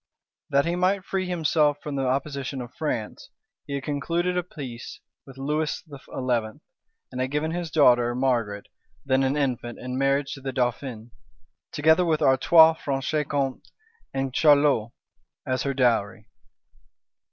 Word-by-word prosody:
That 140 0 +3
he 170 +1 0
might 185 +2 +1
free 190 -1 -2
himself 155 -4 +2
from 150 -2 -4
the 135 -1 -1
opposition 135 0 -2
of 125 -1 -8
France, 120 -9 -4 0.4
he 140 - -3
had 140 - -4
concluded 170 +5 -1
a 180 - +1
peace 135 -9 -9 0.3
with 135 -1 -13
Lewis 150 +3 -2
XI., 140 -3 -8 0.9
and 130 0 -4
had 130 - -1
given 150 +3 -1
his 175 -1 -3
daughter 120 -5 +4
Margaret, 120 -6 0 0.4
then 135 -1 +2
an 135 +2 +1
infant, 125 -4 -2
in 125 +1 -5
marriage 140 +1 +1
to 135 - -9
the 135 0 -4
dauphin; 120 -2 -3 0.6
together 160 +4 +4
with 160 -3 +1
Artois, 160 +5 +6
Franche 140 +2 -1
Compte, 135 -2 -2 0.4
and 135 -1 -2
Charolois, 145 -7 +4 0.6
as 130 0 -1
her 140 - -1
dowry. 110 -6 +1
140 Hz, 145 wpm, -25 LUFS, 130-155 Hz, 0.9 s, Artois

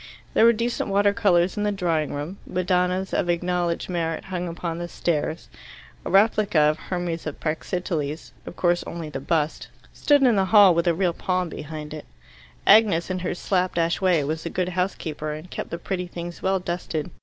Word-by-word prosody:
There 225 - +5
were 235 - +8
decent 235 0 -2
water 200 +1 +3
colours 185 -5 +2
in - - -1
the 210 0 +1
drawing 165 -6 0
room. 150 +7 -5
Madonnas 180 +1 0
of 175 - 0
acknowledged 175 0 0
merit 165 -3 -2
hung 180 -2 -4
upon 170 0 -4
the 175 - -4
stairs. 160 -2 -2 0.6
A - - -3
replica 210 -1 +3
of 150 +1 +4
the - - -15
Hermes 175 -3 -3
of 155 - -6
Praxiteles 160 -1 -3 0.2
of - - -7
course 175 -1 +1
only 165 -2 -6
the 135 - -4
bust 155 +2 -1 0.3
stood 290 -2 +3
in 240 -5 +4
the 190 - +3
hall 200 -2 +7
with 170 +1 0
a 170 - +3
real 180 -1 +1
palm 185 0 -1
behind 150 0 -7
it. 155 - -8 0.6
Agnes, 200 -5 +5
in 185 - -2
her 180 0 -3
slap 185 0 0
dash 170 +1 +1
way, 180 -5 +3
was 155 +3 -3
a 170 - -3
good 180 +1 -1
housekeeper, 170 -4 -3
and 155 +4 -9
kept - - -5
the 170 - -4
pretty 180 0 -4
things 175 0 -7
well 190 0 +1
dusted. 175 -2 -4
175 Hz, 195 wpm, -24 LUFS, 165-190 Hz, 0.6 s, were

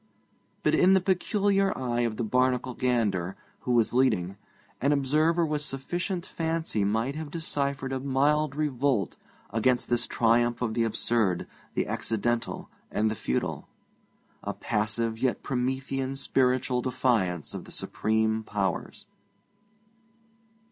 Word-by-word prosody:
But - - +3
in 190 +1 +6
the - - +5
peculiar 195 +1 +1
eye 120 -2 -1
of 115 -3 0
the - - -1
Barnacle 125 +2 +1
gander, 105 -8 0 0.2
who 125 - -1
was 115 -1 +3
leading, 100 -8 +2 0.5
an 140 +3 +3
observer 155 +5 +2
with 150 -1 -1
sufficient 175 +6 -3
fancy 160 -9 -1
might 115 +6 0
have 155 0 -5
deciphered 140 -4 -2
a 130 - -1
mild 140 +2 +1
revolt 140 - 0 0.4
against 120 +4 +1
this 120 - +2
triumph 120 +1 +2
of 115 -2 -1
the 115 0 +1
absurd, 110 -4 +1 0.3
the - - +1
accidental, 115 +2 -2 0.2
and 110 +1 +1
the - - -2
futile; 65 - -2 0.8
a - - -3
passive 110 +1 -1
yet 130 -1 0
Promethean 130 +1 -2
spiritual 130 -2 +1
defiance 115 - 0
of - - -6
the - - -11
supreme 110 0 0
powers. 100 -4 -3
125 Hz, 125 wpm, -28 LUFS, 115-140 Hz, 0.8 s, in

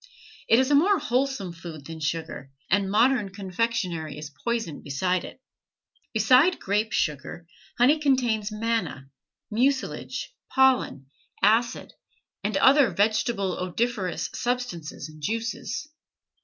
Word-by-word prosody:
It 225 - +5
is 260 +2 +2
a - - +5
more 375 +8 +5
wholesome 250 - -1
food 165 -4 -9
than 160 +1 -8
sugar, 155 -3 -4 0.2
and 195 0 +2
modern 225 0 +3
confectionery 185 -5 -2
is 150 -1 -7
poison 225 - -3
beside 180 +6 -1
it. - - -10 0.7
Beside 255 - +4
grape 210 +3 0
sugar, 150 +2 -2 0.3
honey 270 +6 +5
contains 240 -7 +1
manna, 215 -11 -2 0.4
mucilage, 265 - -1 0.2
pollen, 260 - +2 0.4
acid, 225 +4 +2 0.5
and - - 0
other 270 -2 +6
vegetable 200 0 +1
odoriferous 190 +1 -2
substances 245 -14 -3
and 155 0 -14
juices. 230 - -3
215 Hz, 115 wpm, -26 LUFS, 170-245 Hz, 0.7 s, other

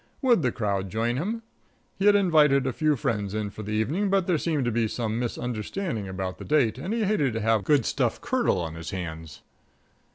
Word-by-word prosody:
Would 240 -8 +4
the 125 -4 +1
crowd 100 -4 -2
join 115 +4 -1
him? 220 - -3 0.5
He 195 - +1
had 205 - +7
invited 150 -8 +4
a 130 - -1
few 155 +3 +2
friends 105 -4 -2
in 105 -1 -2
for 105 - -8
the 105 0 -4
evening, 150 - 0
but 195 -2 +2
there 175 -4 +1
seemed 150 -5 0
to 120 - +1
be 115 0 +1
some 110 0 -2
misunderstanding 120 - -3
about 95 0 -4
the - - -7
date, 130 -6 +2
and 180 +9 -4
he 230 0 0
hated 170 - +1
to 115 - -2
have 110 -1 +2
good 145 +3 +3
stuff 125 -5 0
curdle 240 - +1
on 80 -2 -4
his 80 0 -7
hands. 80 -5 -6
120 Hz, 215 wpm, -26 LUFS, 105-165 Hz, 0.5 s, had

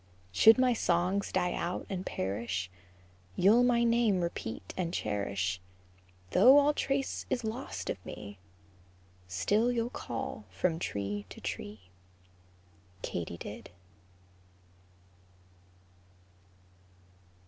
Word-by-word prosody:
Should 220 - +7
my 255 -1 +4
songs 185 0 +1
die 180 - +1
out 175 +1 -3
and 185 -2 -4
perish, 95 - -3 0.6
You'll 210 - +5
my 245 -1 +4
name 230 -5 +3
repeat 110 - -4
and 175 -2 -2
cherish; 100 - -2 0.7
Though 265 +3 +8
all 290 +1 +5
trace 275 -1 -1
is 245 - -1
lost 225 +5 -4
of - - -4
me, 100 -2 -9 0.9
Still 205 - +2
you'll 235 0 -1
call 115 -2 -5
from 160 - 0
tree 100 - -3
to - - -10
tree, 100 -3 -6 1.1
KATYDID. 90 +6 -5
175 Hz, 95 wpm, -31 LUFS, -, 1.1 s, Though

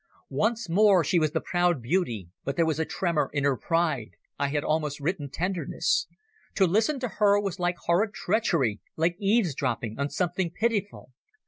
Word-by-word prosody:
Once 225 -3 0
more 190 0 +5
she 170 +4 +2
was 155 -1 +2
the 160 +2 -1
proud 175 -3 +1
beauty, 120 - -1 0.2
but 140 - -3
there 165 - +3
was 160 -1 -1
a 160 - +1
tremor 170 -3 -1
in 145 -2 0
her 140 -1 +3
pride—I 140 -1 -2
had 145 +1 -1
almost 150 -2 -1
written 150 -1 -2
tenderness. 180 +5 -1 0.5
To 195 - +4
listen 220 - +1
to 250 - 0
her 205 -2 +3
was 195 -2 -3
like 175 0 0
horrid 190 +5 +2
treachery, 155 - 0
like 165 +2 +1
eavesdropping 145 - 0
on 140 +1 0
something 175 +3 -1
pitiful. 205 - -2
170 Hz, 165 wpm, -27 LUFS, 145-195 Hz, 0.5 s, more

